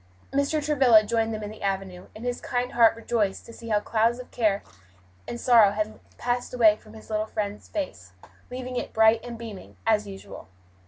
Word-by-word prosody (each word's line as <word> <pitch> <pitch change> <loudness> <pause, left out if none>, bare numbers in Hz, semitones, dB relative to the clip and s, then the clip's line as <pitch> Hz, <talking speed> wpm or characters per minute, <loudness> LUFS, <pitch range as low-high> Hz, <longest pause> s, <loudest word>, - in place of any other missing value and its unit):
Mr. 285 +2 +1
Travilla 260 -7 +6
joined 225 +1 0
them 215 -1 -4
in 210 - -5
the 215 - -12
avenue, 190 -2 -3
and 220 +3 -8
his 245 0 -2
kind 250 0 -2
heart 230 -1 +5
rejoiced 225 -4 -1
to 230 - -11
see 230 0 -9
how 210 - +3
the 205 - -4
clouds 230 +1 +2
of 250 - -10
care 210 -4 +1 0.6
and 240 - -5
sorrow 230 -6 +6
had 215 0 0
all - - -16 0.2
passed 245 +1 -2
away 220 -4 +6
from 215 0 -17
his 220 0 -12
little 215 0 0
friend's 210 -1 -4
face, 90 - -5 0.4
leaving 250 0 -5
it - - -4
bright 220 +1 +5
and 240 -1 -7
beaming, 225 -4 -9
as 215 -2 +2
usual. 195 -1 -10
225 Hz, 205 wpm, -26 LUFS, 210-245 Hz, 0.6 s, Travilla